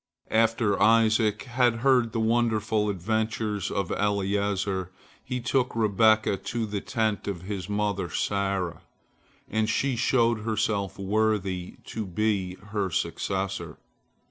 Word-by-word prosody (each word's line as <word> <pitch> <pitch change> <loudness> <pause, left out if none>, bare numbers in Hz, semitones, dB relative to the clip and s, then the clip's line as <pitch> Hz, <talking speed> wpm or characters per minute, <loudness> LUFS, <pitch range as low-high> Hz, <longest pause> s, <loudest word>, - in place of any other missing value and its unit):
After 115 -2 +2
Isaac 110 -1 +4
had 125 -2 +2
heard 125 -4 +4
the 115 - -2
wonderful 110 -2 +1
adventures 105 +1 -1
of 95 -3 -2
Eliezer, 100 -2 0 0.3
he 125 -1 -3
took 125 +1 0
Rebekah 110 -1 +3
to 115 +4 -3
the 105 -2 -3
tent 110 -3 -1
of 95 -4 -4
his 95 -1 -5
mother 105 -3 -1
Sarah, 95 -1 -1 0.7
and 110 +1 0
she 135 +4 +1
showed 115 -1 +2
herself 105 -3 -1
worthy 100 -3 0
to 110 -3 -5
be 95 -1 -1
her 100 -2 -1
successor. 95 +4 -2
105 Hz, 115 wpm, -27 LUFS, 100-115 Hz, 0.7 s, Isaac